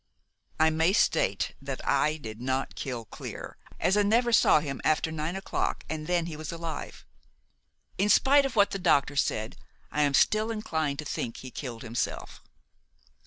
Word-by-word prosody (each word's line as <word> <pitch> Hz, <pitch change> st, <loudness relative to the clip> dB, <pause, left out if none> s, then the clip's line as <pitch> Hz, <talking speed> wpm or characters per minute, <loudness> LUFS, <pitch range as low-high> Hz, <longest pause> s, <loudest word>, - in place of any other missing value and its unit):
"I 160 Hz, 0 st, +5 dB
may 160 Hz, +4 st, +2 dB
state -, -, +1 dB
that -, -, -6 dB
I 155 Hz, +1 st, +2 dB
did 110 Hz, -5 st, -8 dB
not 130 Hz, +1 st, -1 dB
kill 120 Hz, -4 st, -5 dB
Clear, -, -, -8 dB, 0.2 s
as 190 Hz, -, +2 dB
I 210 Hz, -, +4 dB
never 235 Hz, +4 st, +2 dB
saw 180 Hz, -, +6 dB
him 140 Hz, -3 st, -5 dB
after 155 Hz, +1 st, +1 dB
nine 160 Hz, +3 st, -3 dB
o'clock, 195 Hz, -, -2 dB
and 155 Hz, -1 st, -4 dB
then 175 Hz, -2 st, +1 dB
he 165 Hz, -2 st, -6 dB
was 155 Hz, 0 st, -6 dB
alive. 165 Hz, -2 st, -6 dB, 0.9 s
In 205 Hz, +2 st, +2 dB
spite 280 Hz, +5 st, +5 dB
of 260 Hz, -, -9 dB
what 205 Hz, -1 st, +4 dB
the 195 Hz, -, -3 dB
doctor 145 Hz, -5 st, +2 dB
said, 110 Hz, -5 st, -1 dB, 0.3 s
I 150 Hz, -, 0 dB
am 145 Hz, -2 st, +3 dB
still 215 Hz, +7 st, +3 dB
inclined 160 Hz, -10 st, -2 dB
to 150 Hz, -, -5 dB
think 120 Hz, -5 st, -4 dB
he 130 Hz, -, -9 dB
killed 120 Hz, -5 st, -6 dB
himself. 115 Hz, 0 st, -4 dB
155 Hz, 170 wpm, -28 LUFS, 140-195 Hz, 0.9 s, saw